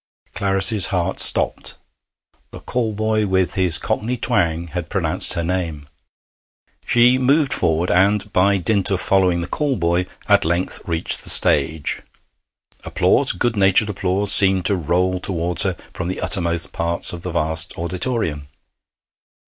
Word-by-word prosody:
Clarice's 95 0 +2
heart 95 0 -3
stopped. - - +2 0.7
The - - -11
call 120 -3 -3
boy, 110 0 -1
with 95 -1 0
his 90 -4 +3
cockney 120 +4 -3
twang, 85 -9 -1
had 85 0 -6
pronounced 90 -2 -2
her 85 -2 -3
name. 85 -5 -4 1.0
She 125 +1 +3
moved 140 +2 +2
forward, 80 +2 0
and, 100 +3 +1
by 100 +2 +2
dint 100 +2 0
of 95 -2 -1
following 95 -3 +1
the 85 - -5
call 145 -3 -2
boy, 85 -1 -1 0.2
at - - +3
length 85 +3 -3
reached 85 -1 -1
the - - -1
stage. 75 +1 +3 0.8
Applause - - +1
good 115 +5 -2
natured 100 +1 +2
applause 100 +1 -1
seemed 95 -3 +4
to 100 - +4
roll 90 +2 -1
towards 90 -2 0
her 95 -2 +1 0.2
from 90 - -5
the 95 - -5
uttermost 85 -2 -1
parts 85 +1 -1
of 85 - -7
the 90 - -6
vast 80 -1 0
auditorium. 85 - -3
90 Hz, 145 wpm, -19 LUFS, 85-100 Hz, 1.0 s, seemed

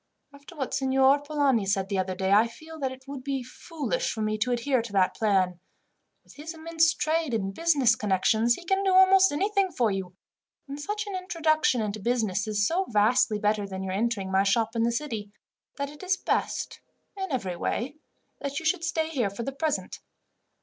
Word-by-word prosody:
After 285 +5 -14
what 270 -4 -4
Signor 270 +1 +3
Polani 285 -7 +1
said 195 -1 0
the 195 -1 -1
other 185 0 -2
day, 190 +1 -1
I 215 +3 +5
feel 315 +7 -12
that 265 -2 -1
it 260 +1 -12
would 275 -2 -7
be 270 -2 -2
foolish 330 - -3
for 220 - -3
me 215 0 0
to 250 +3 0
adhere 245 +1 +1
to 225 -2 -8
that 190 -2 +2
plan. 190 -5 +1 0.6
With - - -18
his 320 +3 -8
immense 325 0 +2
trade 315 -5 0
and 195 -3 -2
business 280 -6 +3
connections 220 +3 +2
he 350 - -12
can 385 +3 +1
do 380 -1 +2
almost 380 -1 +6
anything 395 +4 +1
for 235 -8 +1
you, 190 -2 -4 0.5
and 280 +1 -7
such 420 +6 -3
an 400 -2 -5
introduction 320 - +1
into 210 0 -3
business 215 -2 0
is 205 -1 +1
so 365 - +1
vastly 215 +1 +3
better 210 -1 0
than 190 -1 -5
your 190 -1 -3
entering 200 -2 -1
my 190 0 +4
shop 220 +3 +1
in 230 - +1
the 235 +1 +2
city, 230 -5 -4 0.5
that 280 0 -3
it 295 - -13
is 370 0 0
best, - - -2 0.3
in 385 -3 -4
every 195 -9 -2
way, 265 - -3 0.4
that 280 0 -3
you 325 - -10
should 335 +1 +1
stay 320 -2 0
here 250 -10 0
for 200 +4 -6
the 275 - -3
present. 305 +3 -3
260 Hz, 200 wpm, -27 LUFS, 210-315 Hz, 0.6 s, almost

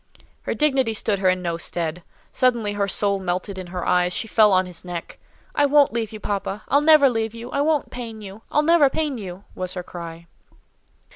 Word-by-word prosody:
Her - - -3
dignity 265 -7 +1
stood 205 -1 0
her 190 -1 +3
in 185 0 0
no 170 -1 -2
stead. 170 0 -3 0.3
Suddenly 235 -5 +1
her 200 -1 0
soul 200 0 +1
melted 185 +1 -3
in 185 - -7
her 180 0 -5
eyes; 180 0 +2
she 225 - -2
fell 215 -1 +5
on 185 0 +3
his 180 -2 -9
neck:—"I 180 +10 -4
won't 285 -3 +4
leave 225 -3 -2
you, 215 - -7
papa; 200 0 -3
I'll 285 - +4
never 305 -2 +7
leave 225 -2 -1
you. 235 +2 -8
I 280 - 0
won't 300 -1 +1
pain 230 -3 -7
you! 205 0 -10
I'll 300 - +3
never 320 -3 +5
pain 290 -3 -2
you!" 190 -1 -8
was 185 0 -4
her 180 - -4
cry. 170 -1 -9
205 Hz, 205 wpm, -23 LUFS, 180-255 Hz, 0.3 s, never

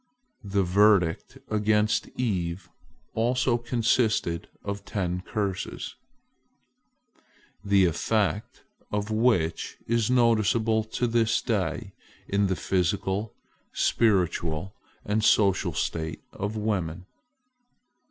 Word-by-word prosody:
The 100 -1 0
verdict 95 -2 +3
against 105 0 +1
Eve 90 -7 -2 0.4
also 120 +1 +1
consisted 115 -7 +1 0.2
of 100 0 -4
ten 90 -3 -2
curses, 100 -1 -3 1.7
the 100 -2 +4
effect 105 +6 -1 0.3
of 105 +1 -2
which 110 -8 +1
is 115 -1 +1
noticeable 115 -2 +3
to 110 +3 -2
this 115 -1 +2
day 100 -2 -2 0.3
in 100 0 +1
the 95 - 0
physical, 95 +3 -1 0.4
spiritual, 90 -4 +1 0.3
and 105 +1 0
social 95 -5 +3
state 80 -1 -3
of 105 +2 -4
woman. 95 -5 -2
105 Hz, 90 wpm, -26 LUFS, 95-110 Hz, 1.7 s, the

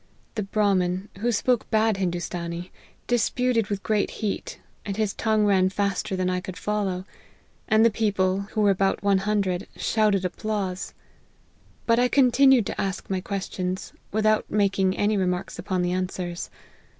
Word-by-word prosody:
The 215 - -2
Brahmin, 195 -2 0
who 240 +3 +1
spoke 240 +2 +1
bad 220 -1 +2
Hindoostanee, 175 -1 -3 0.3
disputed 245 -1 +1
with 200 -1 -3
great 215 -2 +1
heat, 225 - -4 0.2
and 200 -1 -4
his 215 -2 0
tongue 215 -1 +1
ran 190 -2 +4
faster 195 -1 -1
than 185 -1 0
I 180 0 0
could 185 0 -7
follow; 195 -3 -2 0.6
and 220 0 +5
the 230 - +5
people, 195 -3 +1
who 215 - +1
were 205 -1 +5
about 195 +1 0
one 200 -1 +3
hundred, 195 -2 -1
shouted 210 -4 +1
applause. 190 0 -3 0.9
But 230 0 +3
I 250 - +4
continued 265 -2 +5
to - - -3
ask 195 0 -4
my 190 -1 0
questions, 185 -1 -4 0.2
without 215 +1 +2
making 195 -2 +1
any 205 0 +2
remarks 180 -1 -2
upon 185 -2 -1
the 175 - 0
answers. 180 -1 -3
200 Hz, 150 wpm, -25 LUFS, 185-215 Hz, 0.9 s, and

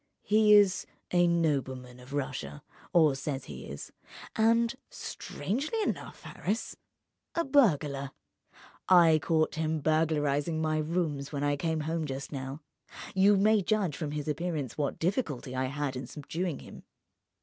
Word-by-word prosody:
"He 210 0 +5
is 200 -3 +4 0.2
a 175 -1 +4
nobleman 130 -7 -1
of 125 +2 -14
Russia, 130 - -4 0.3
or 160 -4 +5
says 135 0 -4
he - - -9
is, 70 +1 -8 0.4
and—strangely 235 - -1
enough, - - -4
Harris!—a 235 - -5
burglar. 150 - +2 0.8
I 170 -4 +7
caught 155 +1 +1
him 160 0 -1
burglarizing 155 0 +1
my 155 -1 +1
rooms 155 -3 -1
when 145 -1 -2
I 145 0 +2
came 160 +1 -1
home 160 +1 -2
just 135 -1 -5
now. 135 +1 -5 0.5
You 195 +1 +5
may 210 +2 +4
judge 190 -5 0
from 150 -2 -4
his 150 -1 -4
appearance 150 -4 -2
what 145 -2 -1
difficulty 160 - -2
I 130 0 0
had 140 0 -3
in 130 -1 -5
subduing 160 +3 -4
him." - - -11
155 Hz, 135 wpm, -30 LUFS, 140-180 Hz, 0.8 s, I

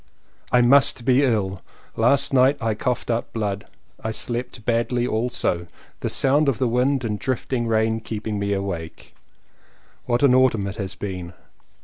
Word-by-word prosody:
I 125 -1 +5
MUST 130 -1 +4
be 130 +2 +4
ill; 100 -7 0 0.3
last 140 +5 +2
night 135 +2 +4
I 110 -1 0
coughed 125 +2 -2
up 115 0 -2
blood. 105 -2 -3 0.4
I 110 - -2
slept 120 0 -4
badly 120 +1 0
also, 110 -7 -1 0.3
the - - -2
sound 140 +2 +3
of 130 - -1
the 130 - +1
wind 125 +3 +1
and 105 -3 -2
drifting 125 -2 -2
rain 110 0 +1
keeping 110 -1 -4
me 100 0 -1
awake. 95 -5 -5 0.9
What 120 +2 +1
an 135 -3 +6
autumn 125 -6 +3
it 100 +2 -5
has 100 -2 -5
been! 90 -3 -6
115 Hz, 155 wpm, -23 LUFS, 105-125 Hz, 0.9 s, an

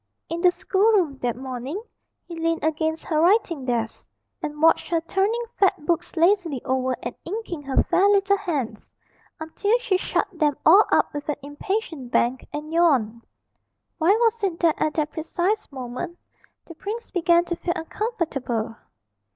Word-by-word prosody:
In 335 +1 -3
the 360 - +6
schoolroom 380 -6 +2
that 240 -2 -1
morning 260 - -5 0.5
he 350 - -9
leaned 330 0 -1
against 315 +1 -1
her 310 -2 +1
writing 345 - +2
desk, 235 -3 -2 0.3
and 300 0 -5
watched 325 +1 +4
her 335 - +2
turning 395 +8 0 0.2
fat 380 -7 +2
books 345 +1 -1
lazily 340 -5 +3
over 260 0 0
and 240 - -4
inking 365 -4 -5
her 275 -2 +1
fair 370 +4 +3
little 400 0 +3
hands, 280 - -3 0.5
until 405 +8 0
she 430 -6 0
shut - - -1
them 300 -5 +1
all 385 +7 +8
up - - +3
with 290 +1 -5
an 300 - +1
impatient 290 - -4
bang 245 +2 +2
and 300 +2 -6
yawned. 260 -10 +2 0.8
Why 340 +4 +5
was 460 0 +1
it 360 -4 -1
that 330 -3 +2
at 305 - +1
that 305 -1 0
precise 350 +6 -2
moment 260 +6 -6 0.5
the 335 - -10
prince 425 +8 -6
began 345 -1 +3
to 345 - -2
feel 345 +1 -2
uncomfortable? 300 - -3
330 Hz, 160 wpm, -24 LUFS, 280-380 Hz, 0.8 s, all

